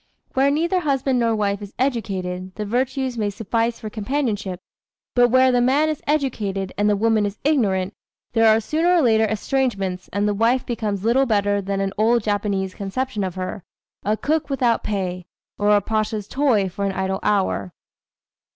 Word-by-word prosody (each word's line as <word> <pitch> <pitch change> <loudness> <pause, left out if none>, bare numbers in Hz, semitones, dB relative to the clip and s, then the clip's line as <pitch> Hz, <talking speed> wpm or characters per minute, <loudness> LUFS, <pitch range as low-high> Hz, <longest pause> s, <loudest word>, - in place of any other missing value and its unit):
Where 270 +1 +3
neither 335 +6 +1
husband 270 -5 0
nor 230 -1 +2
wife 200 -1 -1
is 205 0 -9
educated, 190 -8 -2
the 210 - -4
virtues 255 +2 -1
may 210 -1 0
suffice 225 +3 -1
for 220 - -6
companionship, 210 -5 -2 0.5
but 245 -1 +5
where 255 +1 +5
the 245 -1 +3
man 280 +5 +3
is 310 - -3
educated 215 -10 -1
and 205 +1 +2
the 205 - +3
woman 215 -1 +2
ignorant, 200 -11 +1 0.4
there 225 -1 +4
are 220 - +4
sooner 325 +10 +1
or 345 - +4
later 220 -2 +4
estrangements 205 -4 -1
and 205 +1 0
the 210 - +1
wife 230 +5 +2
becomes 210 -4 -3
little 260 +4 +3
better 205 -2 +1
than 195 0 -2
an 195 0 -2
old 230 +1 +3
Japanese 200 -2 -1
conception 210 +2 -3
of 185 -2 -3
her, 185 0 -5 0.4
"a 210 +2 0
cook 310 +4 -1
without 250 -4 +1
pay," 180 -4 -3 0.3
or 205 0 +2
a 205 -1 +5
pasha's 215 0 -2
toy 250 -8 +2
for 190 +2 -5
an 195 -1 0
idle 190 0 -2
hour. 185 - 0
215 Hz, 175 wpm, -22 LUFS, 200-255 Hz, 0.5 s, but